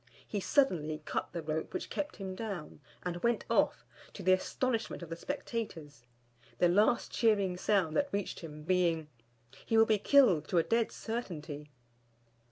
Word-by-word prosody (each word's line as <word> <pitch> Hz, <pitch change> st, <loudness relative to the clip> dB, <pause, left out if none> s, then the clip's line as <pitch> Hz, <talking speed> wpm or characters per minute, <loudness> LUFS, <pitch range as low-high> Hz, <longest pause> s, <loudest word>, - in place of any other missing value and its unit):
He 205 Hz, -, -2 dB
suddenly 160 Hz, -, +1 dB
cut -, -, -2 dB
the 170 Hz, -, -4 dB
rope 160 Hz, -, -3 dB
which 360 Hz, -, -4 dB
kept 295 Hz, 0 st, -3 dB
him 190 Hz, -2 st, -5 dB
down, 190 Hz, -8 st, -6 dB, 0.2 s
and 175 Hz, -1 st, -2 dB
went 235 Hz, 0 st, +1 dB
off, -, -, +2 dB, 0.3 s
to 195 Hz, -, -8 dB
the 185 Hz, +1 st, +5 dB
astonishment 230 Hz, +2 st, -1 dB
of 170 Hz, -, -9 dB
the -, -, -2 dB
spectators: 165 Hz, -, -5 dB, 0.5 s
the 175 Hz, -, +4 dB
last 210 Hz, +6 st, +3 dB
cheering 200 Hz, -5 st, +2 dB
sound 180 Hz, -4 st, +1 dB
that 285 Hz, -, +2 dB
reached 200 Hz, -1 st, -2 dB
him 150 Hz, -2 st, -9 dB
being 170 Hz, -3 st, +1 dB, 0.6 s
"He 225 Hz, -, +3 dB
will 225 Hz, -, +7 dB
be 215 Hz, -2 st, +2 dB
killed 235 Hz, -, +5 dB
to 180 Hz, -, 0 dB
a 165 Hz, -, +5 dB
dead 230 Hz, +3 st, +1 dB
certainty!" 160 Hz, -10 st, -5 dB
185 Hz, 165 wpm, -32 LUFS, 160-225 Hz, 0.6 s, will